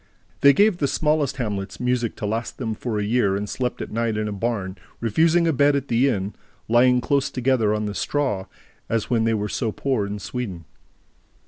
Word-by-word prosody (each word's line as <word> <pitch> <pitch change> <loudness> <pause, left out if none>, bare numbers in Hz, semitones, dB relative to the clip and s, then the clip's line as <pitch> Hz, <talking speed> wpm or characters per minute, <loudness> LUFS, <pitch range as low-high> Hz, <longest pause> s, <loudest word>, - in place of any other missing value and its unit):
They 140 - +7
gave 205 +6 +3
the 145 - +1
smallest 150 -2 +1
hamlets 105 -6 -3
music 125 -2 0
to - - -5
last 110 +3 -3
them 115 -4 -2
for 110 0 -3
a 105 - 0
year 105 -2 +2
and 100 +1 -3
slept 125 +3 -3
at - - -9
night 115 -1 -1
in 105 0 -1
a - - -3
barn, 100 -3 -3 0.2
refusing 165 +9 +3
a 165 - +2
bed 145 +1 +4
at 140 0 -2
the 120 +4 +3
inn, 100 -3 -2 0.3
lying 125 +2 +4
close 140 +1 +1
together 125 -4 +1
on 105 0 -1
the 105 - -3
straw, 130 -5 -1 0.4
as 115 +1 -1
when 115 -2 +2
they 115 0 +2
were 105 -1 -2
so 115 +1 -2
poor 125 -4 -1
in 105 +1 -4
Sweden. 100 -5 -5
115 Hz, 205 wpm, -23 LUFS, 105-135 Hz, 0.4 s, They